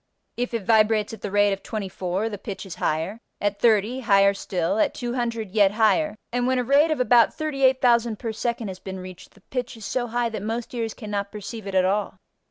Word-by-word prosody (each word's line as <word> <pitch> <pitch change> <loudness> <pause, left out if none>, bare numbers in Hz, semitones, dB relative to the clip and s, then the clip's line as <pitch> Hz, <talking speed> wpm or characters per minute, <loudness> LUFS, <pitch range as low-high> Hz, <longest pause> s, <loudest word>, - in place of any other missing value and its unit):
If 245 0 -2
it 215 -4 -3
vibrates 215 -1 +3
at 225 - -9
the 205 - -4
rate 205 0 +3
of 195 - -5
24 195 -1 -3
the 205 -3 -6
pitch 200 0 -6
is 190 - -7
higher, 165 +8 -1 0.2
at 205 0 -1
30 225 +2 +3
higher 200 -5 +4
still, 185 0 -2
at - - +2
200 240 -4 -3
yet 200 -1 +4
higher, 225 +7 +2 0.2
and 245 0 +1
when 260 0 +2
a 250 - +1
rate 280 +5 +4
of 310 - 0
about 245 -2 +4
38,000 260 -6 +2
per 230 0 -4
second 230 -1 -2
has 185 -1 -7
been 190 -1 -7
reached 185 -1 -11
the 205 - -20
pitch 250 +2 -5
is 220 - -9
so 245 +3 -1
high 240 0 0
that 220 - -5
most 225 +4 -4
ears 230 -2 -3
cannot 205 -3 -4
perceive 210 0 -7
it 195 - -4
at 185 -1 +4
all. 200 +2 -1
220 Hz, 215 wpm, -24 LUFS, 200-240 Hz, 0.2 s, higher